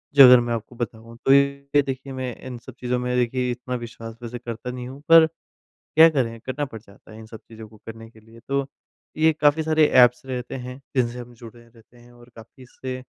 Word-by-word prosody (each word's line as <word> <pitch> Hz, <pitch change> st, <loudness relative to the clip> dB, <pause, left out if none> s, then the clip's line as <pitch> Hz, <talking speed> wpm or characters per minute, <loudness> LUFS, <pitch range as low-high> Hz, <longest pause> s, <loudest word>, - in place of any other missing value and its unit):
जो 140 Hz, -, +10 dB
अगर 125 Hz, 0 st, +8 dB
मैं 120 Hz, 0 st, -2 dB
आपको 115 Hz, +2 st, -6 dB
बताऊँ 115 Hz, -1 st, -7 dB
तो 135 Hz, -, +6 dB
ये 140 Hz, +1 st, +2 dB
देखिए 135 Hz, 0 st, -6 dB
मैं 130 Hz, -2 st, -5 dB
इन 125 Hz, -2 st, -7 dB
सब 130 Hz, -, -13 dB
चीज़ों 125 Hz, 0 st, -1 dB
में 125 Hz, 0 st, -2 dB
देखिए 125 Hz, +1 st, 0 dB
इतना 125 Hz, +1 st, -5 dB
विश्वास 115 Hz, -1 st, -8 dB
वैसे 120 Hz, +1 st, -6 dB
करता 120 Hz, +1 st, -6 dB
नहीं 125 Hz, 0 st, -7 dB
हूँ, 135 Hz, +2 st, -11 dB
पर 165 Hz, -1 st, +8 dB, 0.5 s
क्या 160 Hz, +1 st, +5 dB
करें? 120 Hz, -6 st, -2 dB
करना 130 Hz, +5 st, -4 dB
पड़ 115 Hz, -6 st, -10 dB
जाता 105 Hz, 0 st, -19 dB
है 110 Hz, -, -12 dB
इन 110 Hz, -, -11 dB
सब 110 Hz, 0 st, -12 dB
चीज़ों 110 Hz, -1 st, -11 dB
को 110 Hz, -, -18 dB
करने 115 Hz, 0 st, -10 dB
के 110 Hz, -, -19 dB
लिए। 115 Hz, +1 st, -18 dB
तो 140 Hz, 0 st, -1 dB, 0.5 s
ये 160 Hz, +1 st, +4 dB
काफ़ी 150 Hz, +1 st, +2 dB
सारे 155 Hz, -1 st, +3 dB, 0.2 s
ऐप्स 125 Hz, +1 st, 0 dB
रहते 125 Hz, -2 st, -5 dB
हैं 125 Hz, +2 st, -9 dB, 0.2 s
जिनसे 120 Hz, -1 st, 0 dB
हम 120 Hz, 0 st, -10 dB
जुड़े 120 Hz, 0 st, -13 dB
रहते 115 Hz, +1 st, -23 dB
हैं 120 Hz, 0 st, -19 dB
और 120 Hz, 0 st, -18 dB
काफ़ी 115 Hz, +4 st, -15 dB
इससे 130 Hz, +1 st, -8 dB
125 Hz, 225 wpm, -23 LUFS, 115-135 Hz, 0.5 s, जो